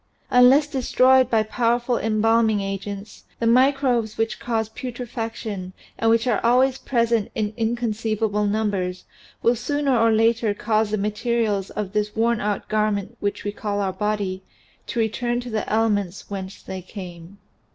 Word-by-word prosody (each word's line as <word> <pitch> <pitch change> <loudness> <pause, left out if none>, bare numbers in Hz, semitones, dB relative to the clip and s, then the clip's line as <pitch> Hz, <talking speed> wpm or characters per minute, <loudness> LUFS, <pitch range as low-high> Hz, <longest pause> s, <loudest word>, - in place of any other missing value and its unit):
Unless 250 +4 +6
destroyed 260 -2 +3
by 225 -3 +3
powerful 240 +2 0
embalming 225 0 +2
agents 195 +1 -6
the 230 - -1
microbes 250 -2 +3
which 225 0 -1
cause 225 -2 -1
putrefaction 225 -5 -6 0.2
and 225 - +1
which 230 +1 +3
are 240 -5 +1
always 255 +3 +3
present 230 -4 +1
in 215 -1 -1
inconceivable 220 -2 -1
numbers 200 -4 -1 0.4
will 235 +1 +4
sooner 285 +2 0
or 230 -1 +4
later 225 -1 +2
cause 215 0 +1
the 215 - 0
materials 210 -1 -1
of 205 -2 -5
this 210 0 -1
worn 230 0 +1
out 205 -1 -2
garment 210 -2 -1
which 205 0 -2
we 205 - -2
call 205 -1 -3
our 195 -2 -1
body 205 -3 -2 0.5
to 240 - -3
return 240 +2 0
to 245 -1 -7
the 215 -1 -2
elements 205 -4 0
whence 190 -1 -6
they 190 -1 -6
came. 180 -1 -10
220 Hz, 150 wpm, -23 LUFS, 205-235 Hz, 0.5 s, Unless